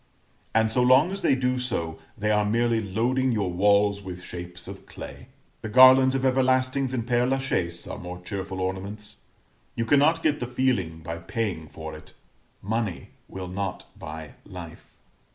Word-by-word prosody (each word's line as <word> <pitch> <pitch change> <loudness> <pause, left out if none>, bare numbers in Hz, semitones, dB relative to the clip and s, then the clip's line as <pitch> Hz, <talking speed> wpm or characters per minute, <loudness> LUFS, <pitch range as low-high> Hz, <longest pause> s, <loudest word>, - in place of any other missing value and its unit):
And 110 0 +3
so 125 - +2
long 130 +7 +5
as 195 +1 -4
they 170 - +3
do 125 -1 0
so 85 -11 -3 0.2
they 105 +1 0
are 105 0 +3
merely 115 +2 +1
loading 120 +6 0
your 100 -5 0
walls 100 +2 +3
with 90 -2 -8
shapes 90 0 -8
of - - -10
clay: - - -10 0.3
the 110 - -5
garlands 130 +2 +7
of 135 0 0
everlastings 130 0 +2
in 125 -3 -1
Père 120 +1 +1
la 135 - +2
Chaise 85 -11 -2
are - - -6
more 90 0 -7
cheerful 95 +1 -5
ornaments. 100 +3 -5 0.6
You 115 - -1
cannot 145 +6 +4
get 150 -2 +2
the 125 - -3
feeling 120 -11 0
by 85 0 -5
paying 90 -4 -3
for 80 +1 -8
it 75 - -13 0.5
money 110 -2 -3 0.2
will 95 -1 -7
not 95 0 -4
buy 80 -1 -8
life. 85 -3 -11
105 Hz, 170 wpm, -26 LUFS, 90-130 Hz, 0.6 s, garlands